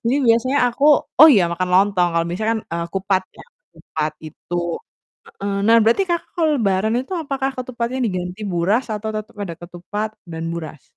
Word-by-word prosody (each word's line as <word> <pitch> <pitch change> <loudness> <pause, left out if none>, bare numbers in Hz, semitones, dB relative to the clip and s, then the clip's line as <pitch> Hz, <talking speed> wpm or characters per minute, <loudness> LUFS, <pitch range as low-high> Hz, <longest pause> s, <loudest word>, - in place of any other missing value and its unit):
jadi 235 +3 +2
biasanya 235 +5 +3
aku 255 +4 -2 0.3
oh 315 +4 +11
iya, 205 -7 +5
makan 180 +1 -2
lontong 190 -2 +4
kalau 165 - +2
biasanya 215 +6 -1
kan, 220 - -2
eee, 170 0 -2
kupat 190 0 +1 0.2
ya, - - -11 0.3
kupat 155 -1 -4
itu 155 +3 -9 0.7
heeh. 200 0 -5
Nah, 230 +1 +6
berarti 230 - +3
Kakak 340 -1 -1
kalau 325 -3 +2
lebaran 215 -1 +1
itu 265 +9 -6
apakah 275 -2 -2
ketupatnya 250 0 -3
diganti 180 0 -4
buras 195 +9 +1
atau 210 +1 -4
tetep 215 +2 -7
ada 175 -4 -5
ketupat 180 +5 -5 0.2
dan 165 0 -5
buras? 160 -4 -7
205 Hz, 175 wpm, -20 LUFS, 175-235 Hz, 0.7 s, oh